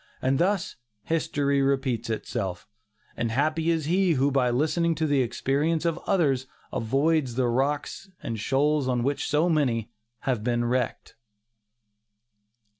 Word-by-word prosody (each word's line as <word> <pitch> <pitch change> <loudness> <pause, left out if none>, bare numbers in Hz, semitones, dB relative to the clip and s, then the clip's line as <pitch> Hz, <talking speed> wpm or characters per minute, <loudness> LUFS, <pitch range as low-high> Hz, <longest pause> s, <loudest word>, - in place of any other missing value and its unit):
And 135 +1 +1
thus 190 0 0 0.3
"history 145 -3 0
repeats 135 -4 0
itself," 95 -5 -3 0.5
and 115 - -1
happy 155 +7 0
is 165 -3 +1
he 180 +2 +2
who 140 0 +2
by 130 -2 +2
listening 160 +6 +1
to 160 - 0
the 145 -3 +2
experience 145 +7 0
of 170 0 0
others 140 -9 +2 0.3
avoids 135 +2 +1
the 130 -1 +1
rocks 140 +9 -1
and 115 -1 -4
shoals 140 +4 +1
on 125 -2 0
which 140 +2 -1
so 150 +3 +2
many 125 -9 +1 0.3
have 125 -7 -1
been 120 0 0
wrecked. 125 0 -2
140 Hz, 135 wpm, -26 LUFS, 125-160 Hz, 0.5 s, he